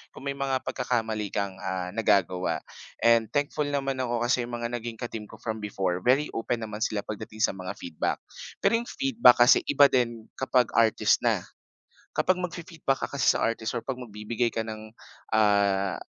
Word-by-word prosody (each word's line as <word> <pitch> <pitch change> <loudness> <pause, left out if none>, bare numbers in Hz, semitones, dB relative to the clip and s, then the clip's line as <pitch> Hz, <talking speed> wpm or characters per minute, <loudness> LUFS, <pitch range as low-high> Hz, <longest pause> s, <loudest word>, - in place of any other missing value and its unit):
kung - - -10
may 140 - -2
mga 135 -1 0
pagkakamali 115 -5 -2
kang, 100 -2 -2
ah, 95 -1 -3
nagagawa. 90 -6 +1 0.4
And 115 -1 +5
thankful 145 +1 0
naman 135 -1 -1
ako 120 -1 -1
kasi 125 -1 +2
‘yong 120 - -9
mga 120 - -2
naging 115 -1 -7
ka-team 115 -3 -5
ko - - -13
from 110 -1 -4
before, 95 -3 -1
very 135 +5 +3
open 115 +1 -1
naman 105 -1 -6
sila 105 - -1
pagdating 110 0 -7
sa - - +2
mga 95 -1 -5
feedback. 80 -3 -2 0.4
Pero - - +3
‘yong 240 - -7
feedback 235 - +5
kasi 125 - +6
iba 145 0 +7
din 120 -3 0
kapag 130 -2 +2
artist 115 -2 +3
na. - - +3 0.8
Kapag 185 0 +2
magfi-feedback 170 -5 -2
ka - - -20
kasi 140 - +3
sa - - -2
artist 115 -1 -2
or 115 - -3
'pag 135 - -1
magbibigay 115 +1 -2
ka 115 - -1
ng, 110 0 -7 0.5
ah, 100 -3 +3
115 Hz, 180 wpm, -27 LUFS, 105-130 Hz, 0.8 s, iba